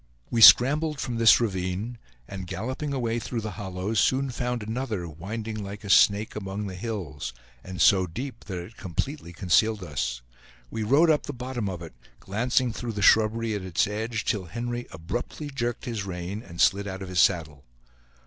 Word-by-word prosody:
We 115 - +1
scrambled 150 +6 +7
from 120 -2 -3
this 115 -1 +7
ravine, 100 +2 -2 0.3
and 95 -2 -7
galloping 130 - -4
away 120 -4 -1
through 115 0 -4
the 110 0 -4
hollows, 95 +1 -3
soon 130 +4 +2
found 125 -1 -2
another, 110 -5 -3
winding 105 +7 -5
like 100 +1 -8
a 100 - -2
snake 105 +2 +4
among 100 0 -4
the 95 - -5
hills, 90 - -5 0.3
and 95 0 -8
so 95 -3 +5
deep 120 +8 -7
that 95 -3 -5
it 90 +6 -9
completely 95 - -4
concealed 100 +4 +2
us. 65 -6 -3 0.5
We 110 - -3
rode 140 +10 +4
up 150 - 0
the 145 - -4
bottom 125 -4 -4
of 90 -2 -6
it, 80 - -10 0.3
glancing 120 +4 0
through 120 -1 -4
the 105 -1 -3
shrubbery 110 +1 +4
at 105 - -3
its 90 -3 +1
edge, 110 +1 -3
till 100 -4 -1
Henry 120 +6 -4
abruptly 120 - -5
jerked 120 -2 -3
his 115 -5 -3
rein, 95 +2 -5
and 85 -7 -12
slid 100 +1 +3
out 95 0 -5
of 95 - -7
his 90 -1 0
saddle. 80 -7 +2
105 Hz, 180 wpm, -26 LUFS, 95-120 Hz, 0.5 s, scrambled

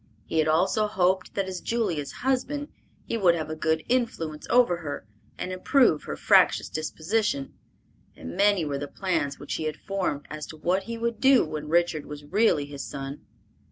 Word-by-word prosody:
He 160 - -1
had 155 - +3
also 190 +7 +2
hoped 190 -2 +1
that 195 - 0
as 185 -1 -5
Julia's 175 -11 -1
husband 270 +3 0 0.4
he 230 - -2
would 175 -4 +5
have 155 -2 -4
a - - -3
good 160 0 0
influence 165 -12 -1
over 240 -8 +4
her, 145 -4 -6 0.3
and 185 - -4
improve 185 - +3
her 75 - -4
fractious - - +4
disposition; 155 0 -1 0.6
and 85 - -8
many 200 -4 +3
were 140 -2 -2
the 145 - -4
plans 160 -6 -1
which 145 - -6
he 160 - -2
had 155 -1 -3
formed 185 -7 -2
as 155 0 -6
to 155 - -10
what 185 +5 0
he 230 0 -5
would 235 0 -2
do 265 -5 +5
when 150 -1 -5
Richard 170 -2 +1
was 150 0 -8
really 170 -3 +2
his 140 -1 -7
son. 140 +1 -6
170 Hz, 185 wpm, -26 LUFS, 150-210 Hz, 0.6 s, would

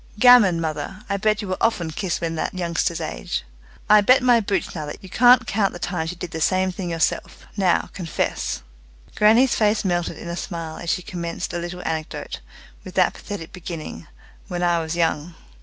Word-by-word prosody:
"Gammon, 225 -8 +7
mother! 160 +5 -4
I 200 - +1
bet 215 +1 +1
you - - -5
were 185 - -3
often 175 -8 +1
kissed 180 +2 -2
when 165 -1 -1
that 165 - -3
youngster's 170 -1 -1
age. 160 -2 -4 0.4
I 210 0 +7
bet 250 +5 +5
my 245 -2 +5
boots 205 -2 -2
now 155 -3 -5
that - - -8
you 190 - -10
can't 245 +6 +6
count 200 -1 0
the - - -6
times 170 -2 -3
you 180 - -6
did 175 -1 -6
the 160 - -5
same 185 +3 +2
thing 180 -1 -5
yourself. 165 -1 -1
Now, 190 -4 +1
confess." 165 - -2 0.5
Grannie's 230 +5 +5
face 215 -1 +2
melted 175 -2 -1
in - - -8
a 170 - -3
smile 165 -3 -5
as 170 - -5
she 180 - 0
commenced 170 -2 -5
a 175 - -2
little 175 +1 -6
anecdote, 160 0 -4 0.4
with - - -10
that - - +3
pathetic 195 -6 -8
beginning, 160 - -7 0.4
"When 175 0 -3
I 175 -1 +3
was 160 0 -3
young." 165 -1 0
175 Hz, 195 wpm, -23 LUFS, 165-205 Hz, 0.5 s, Gammon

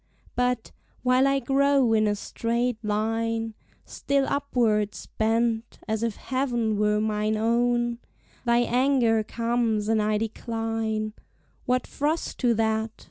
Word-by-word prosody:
But, 250 -2 0 0.3
while 255 +1 +4
I 275 0 +3
grow 275 -2 +3
in 215 -1 +3
a 205 - +1
straight 235 +2 -2
line, 225 +1 -1 0.3
Still 280 -1 0
upwards 235 -7 0
bent, 225 +1 0
as 220 0 -1
if 230 -3 -1
heav'n 240 -5 -1
were 210 0 +2
mine 215 0 0
own, 240 +1 +1 0.4
Thy 240 -1 +3
anger 245 -3 +2
comes, 230 -2 0
and 220 -1 +2
I 210 0 +1
decline: 225 -1 -2 0.5
What 250 0 +1
frost 305 +3 -2
to 240 -3 +3
that? 220 0 +1
230 Hz, 125 wpm, -26 LUFS, 220-245 Hz, 0.5 s, while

